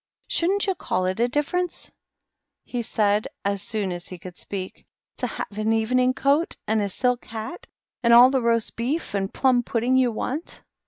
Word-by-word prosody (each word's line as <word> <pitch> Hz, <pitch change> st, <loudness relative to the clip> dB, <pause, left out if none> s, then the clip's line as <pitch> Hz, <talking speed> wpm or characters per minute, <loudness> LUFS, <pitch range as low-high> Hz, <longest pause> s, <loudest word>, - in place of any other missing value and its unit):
" -, -, -48 dB
Shouldn^t 385 Hz, +4 st, +2 dB
you 385 Hz, -, +1 dB
call 185 Hz, -, -2 dB
it 185 Hz, +3 st, -1 dB
a 240 Hz, -, +3 dB
difference," 295 Hz, +7 st, -2 dB, 0.7 s
he 245 Hz, -, -3 dB
said, 210 Hz, -2 st, +1 dB, 0.2 s
as 200 Hz, -1 st, 0 dB
soon 205 Hz, -2 st, -2 dB
as 175 Hz, 0 st, -5 dB
he 185 Hz, -, -7 dB
could 175 Hz, +1 st, -10 dB
speak, 190 Hz, -1 st, -7 dB
" -, -, -62 dB
to -, -, 0 dB
have 210 Hz, -, -6 dB
an 215 Hz, +1 st, +1 dB
evening 250 Hz, +3 st, +2 dB
coat, 285 Hz, +5 st, +2 dB
and 220 Hz, 0 st, +2 dB
a 200 Hz, -, -1 dB
silk 250 Hz, +5 st, 0 dB
hat, 285 Hz, -, -7 dB, 0.3 s
and 235 Hz, -1 st, +3 dB
all 245 Hz, +2 st, +9 dB
the 265 Hz, -1 st, +1 dB
roast 230 Hz, -1 st, +1 dB
beef 260 Hz, +6 st, -2 dB
and 195 Hz, -1 st, -1 dB
plum 255 Hz, -2 st, +3 dB
pudding 240 Hz, +2 st, +1 dB
you 255 Hz, -2 st, +3 dB
want?" 270 Hz, +8 st, -4 dB
235 Hz, 195 wpm, -24 LUFS, 205-260 Hz, 0.7 s, all